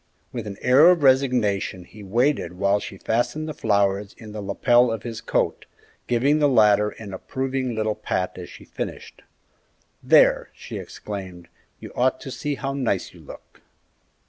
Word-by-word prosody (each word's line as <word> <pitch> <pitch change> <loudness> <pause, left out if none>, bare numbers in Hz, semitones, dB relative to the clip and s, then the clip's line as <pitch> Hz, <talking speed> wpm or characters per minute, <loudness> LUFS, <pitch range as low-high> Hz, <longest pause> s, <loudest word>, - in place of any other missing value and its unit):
With 115 -3 -5
an 100 -1 -7
air 140 +7 +6
of 175 -4 +3
resignation 125 -9 +2
he 105 +4 -14
waited 115 - 0
while 100 +1 +2
she 95 - -8
fastened 120 +10 -1
the 155 - -4
flowers 100 -5 0
in 110 -2 -11
the 105 0 -6
lapel 120 +4 +3
of 115 -2 -4
his 115 -2 -6
coat, - - -1 0.4
giving 135 +5 +2
the 145 -1 +4
latter 105 -4 +4
an 105 -2 -10
approving 130 +4 -3
little 110 0 0
pat 90 -2 -3
as 90 - -8
she - - -13
finished. - - -7 0.8
"There!" - - +4
she - - -7
exclaimed; 95 -4 -8 0.3
"you - - -10
ought 130 +1 +1
to 135 - -7
see 145 +2 -3
how 135 +1 -4
nice 125 -9 -2
you - - -15
look!" - - -14
115 Hz, 165 wpm, -23 LUFS, 100-130 Hz, 0.8 s, air